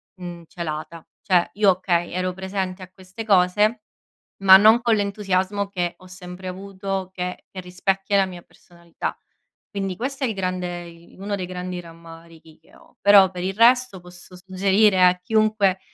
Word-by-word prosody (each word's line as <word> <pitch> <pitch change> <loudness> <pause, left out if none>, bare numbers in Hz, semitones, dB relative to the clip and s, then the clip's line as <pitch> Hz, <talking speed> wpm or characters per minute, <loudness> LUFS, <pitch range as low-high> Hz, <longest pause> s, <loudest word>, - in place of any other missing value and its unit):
mhmm, 175 -2 -9
celata. 160 0 -7 0.2
Cioè, 180 -3 +2
io, 205 -1 +3
okay, 175 -2 -1
ero 185 0 -2
presente 190 0 -4
a 185 - -13
queste 190 +4 -10
cose, 210 +3 +2 0.6
ma 190 -1 +9
non 220 +4 +5
con 230 -1 +3
l'entusiasmo 200 -1 -1
che 175 -3 -3
ho 185 - -16
sempre 185 0 -9
avuto 190 0 -5
che 180 0 -5
che 185 - -7
rispecchia 195 +2 -1
la 195 - +3
mia 180 -2 -10
personalità. 170 -1 -8 0.5
Quindi 195 -3 -4
questo 270 +3 -4
è - - 0
il 225 - -2
grande 180 -2 -4
i 170 0 -17
uno 200 +1 -3
dei 185 - -4
grandi 180 0 -6
rammarichi 165 -1 -15
che 160 - -26
ho. - - -22
Però, 200 -2 +7
per 180 -1 -6
il 190 +1 -2
resto, 240 -1 +3
posso 180 +1 -13
suggerire 190 +1 +2
a 180 0 +4
chiunque, 215 -1 +1
185 Hz, 165 wpm, -22 LUFS, 180-200 Hz, 0.6 s, ma